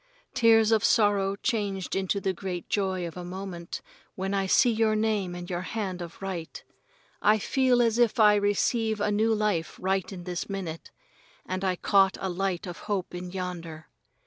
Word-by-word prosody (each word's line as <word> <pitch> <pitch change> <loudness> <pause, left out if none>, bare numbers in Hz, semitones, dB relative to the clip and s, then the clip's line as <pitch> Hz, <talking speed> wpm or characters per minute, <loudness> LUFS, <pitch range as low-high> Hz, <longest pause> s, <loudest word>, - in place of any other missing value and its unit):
Tears 225 -1 +5
of 220 0 +3
sorrow 205 -4 +3
changed 200 -5 -2
into 195 +1 0
the 190 -1 -1
great 180 -1 -5
joy 190 -3 0
for 180 - -9
a - - -6
moment 180 -1 -6 0.3
when 190 +1 -3
I 195 -1 0
see 245 +5 +5
your 220 -1 +2
name 210 -5 0
and 175 0 -7
your 175 -1 -3
hand 190 -3 -4
of 170 -1 -8
write. 180 -4 -5 0.6
I 210 +1 +5
feel 250 +2 +2
as 230 0 +1
if 240 0 +3
I 210 -1 +7
receive 210 +2 +1
a 205 0 +1
new 220 +2 +2
life 210 -7 0
right 190 +1 -1
in 180 -2 -7
this 175 +1 -4
minute, 180 -5 -5 0.6
and 185 +1 -3
I 185 -1 +1
caught 195 +1 +3
a 190 - -2
light 185 -1 -2
of 175 -2 -7
hope 195 -4 -2
in 180 0 -6
yonder. 175 -4 -6
195 Hz, 180 wpm, -27 LUFS, 180-215 Hz, 0.6 s, I